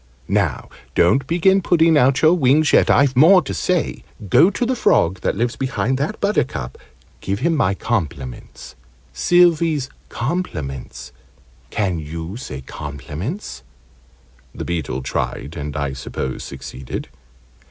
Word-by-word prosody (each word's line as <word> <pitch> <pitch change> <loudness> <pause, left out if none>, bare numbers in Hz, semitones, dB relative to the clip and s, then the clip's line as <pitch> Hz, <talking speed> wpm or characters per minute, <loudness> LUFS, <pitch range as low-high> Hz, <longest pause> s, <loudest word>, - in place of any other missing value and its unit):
Now - - 0 0.3
don't 130 +11 +3
begin 190 +3 +3
putting 165 -2 +3
out 130 -1 +3
your 160 +2 +7
wings 150 -1 +3
yet; - - +5
I've 140 -2 +4
more 180 +8 +7
to - - -5
say. 180 -3 -1 0.3
Go 175 - +6
to 225 +5 -2
the 255 +2 0
frog 90 - +2
that - - 0
lives 120 +3 0
behind 130 -1 -1
that 155 +10 -2
buttercup 120 - -1 0.4
give 100 +3 -3
him 165 +3 +2
my 100 -9 +1
compliments 70 - -4 0.4
Sylvie's 165 - +3 0.2
compliments 70 - -4 0.6
can 95 -5 -1
you 80 +4 -6
say 115 - -7
compliments'?" 75 - -6 0.9
The - - -5
Beetle 70 -7 -3
tried 70 +3 -3
and, 75 -2 -5
I 70 -2 -2
suppose, 65 0 -5
succeeded. 65 -1 -7
120 Hz, 130 wpm, -20 LUFS, -, 0.9 s, your